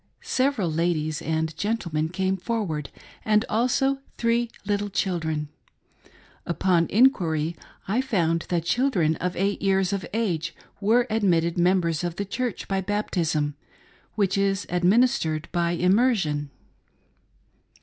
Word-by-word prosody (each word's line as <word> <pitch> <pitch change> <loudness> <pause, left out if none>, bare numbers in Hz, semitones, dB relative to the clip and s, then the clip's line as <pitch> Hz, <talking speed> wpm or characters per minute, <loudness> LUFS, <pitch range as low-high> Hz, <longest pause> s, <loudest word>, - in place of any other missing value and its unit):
Several 255 -8 +1
ladies 155 -2 0
and 160 0 -1
gentlemen 170 -8 -1
came 190 +2 0
forward, 190 - -3 0.3
and 215 0 +3
also 255 +4 +1 0.2
three 235 0 +1 0.2
little 205 0 -1
children. 160 -6 -1 0.9
Upon 170 -1 +1
inquiry 170 - +2 0.3
I 220 +7 +1
found 170 -10 0
that 170 -2 0
children 185 - +2
of 180 +1 -2
eight 200 +2 0
years 195 -1 +2
of 195 -1 -2
age 175 -7 -1 0.2
were 225 +4 +3
admitted 170 -6 +2
members 175 -2 +2
of 175 -1 -2
the 200 - -3
Church 240 +3 -3
by 195 -1 0
baptism 175 -7 -1 0.3
— - - -32
which 195 -2 +1
is 195 0 +1
administered 180 - +2
by 170 0 0
immersion. 180 - +2
185 Hz, 120 wpm, -25 LUFS, 165-215 Hz, 0.9 s, and